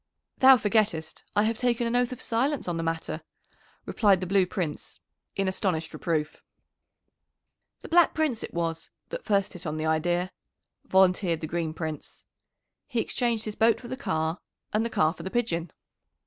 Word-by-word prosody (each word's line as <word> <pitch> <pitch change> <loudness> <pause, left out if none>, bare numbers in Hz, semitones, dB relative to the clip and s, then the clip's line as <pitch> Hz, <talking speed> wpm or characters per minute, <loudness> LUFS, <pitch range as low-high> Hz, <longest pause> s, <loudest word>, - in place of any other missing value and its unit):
"Thou 265 0 +9
forgettest 210 -7 0
I 205 - +4
have 220 0 0
taken 240 -1 +1
an 230 +1 0
oath 245 0 +2
of 255 - -6
silence 260 +4 0
on 175 - -1
the - - -1
matter," 165 0 -3 0.6
replied 200 -5 +3
the 185 - -3
Blue 190 0 +3
Prince 175 -6 -4 0.4
in 195 -1 0
astonished 180 -4 -1
reproof. 155 -3 -2 1.4
"The - - -7
Black 345 0 +4
Prince 300 -8 0
it - - -6
was 165 -1 -3 0.2
that - - -6
first 200 -3 +1
hit 180 -1 -7
on 155 +1 -3
the 155 - -2
idea," 175 +3 +1 0.5
volunteered 185 -3 +3
the - - -2
Green 165 0 -2
Prince. 155 -3 -6 0.6
"He 245 -5 -1
exchanged 230 -1 0
his 215 - -3
boat 225 +1 +3
for 240 - -10
the - - -3
car 165 - -1 0.3
and 215 +1 +2
the 230 - -1
car 155 -7 +2
for 170 - -11
the 185 - -4
pigeon." 175 -8 -1
190 Hz, 175 wpm, -27 LUFS, 165-230 Hz, 1.4 s, Thou